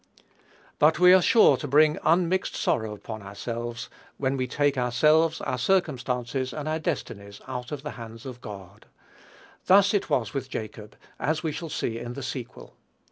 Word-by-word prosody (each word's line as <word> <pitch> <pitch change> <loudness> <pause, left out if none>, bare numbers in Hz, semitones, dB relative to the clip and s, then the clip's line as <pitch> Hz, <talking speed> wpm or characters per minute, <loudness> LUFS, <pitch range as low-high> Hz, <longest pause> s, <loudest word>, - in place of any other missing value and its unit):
But 155 +2 +4
we 180 +1 +7
are 185 - +6
sure 230 +4 +5
to 145 - -5
bring 150 +3 +4
unmixed 180 +2 +1
sorrow 110 -2 -1
upon 110 +1 -8
ourselves 115 +4 -6 0.3
when 135 0 0
we 130 -1 -2
take 145 0 +1
ourselves, 155 +6 +2
our 125 - -3
circumstances, 130 -6 -1
or 150 0 -5
our 155 +1 -1
destinies, 100 - -5
out 125 0 -6
of 145 -2 -5
the 150 - -5
hands 115 0 -10
of 125 -2 -8
God. 100 -1 -11 0.8
Thus 195 +2 +6
it 205 - 0
was 125 -8 0
with 135 -1 -4
Jacob, 110 -2 -7 0.2
as 155 0 -1
we 160 - -1
shall 165 +2 -6
see 115 -5 -3
in 120 +1 -6
the 140 - -7
sequel. 130 -1 -7
130 Hz, 170 wpm, -26 LUFS, 115-155 Hz, 0.8 s, we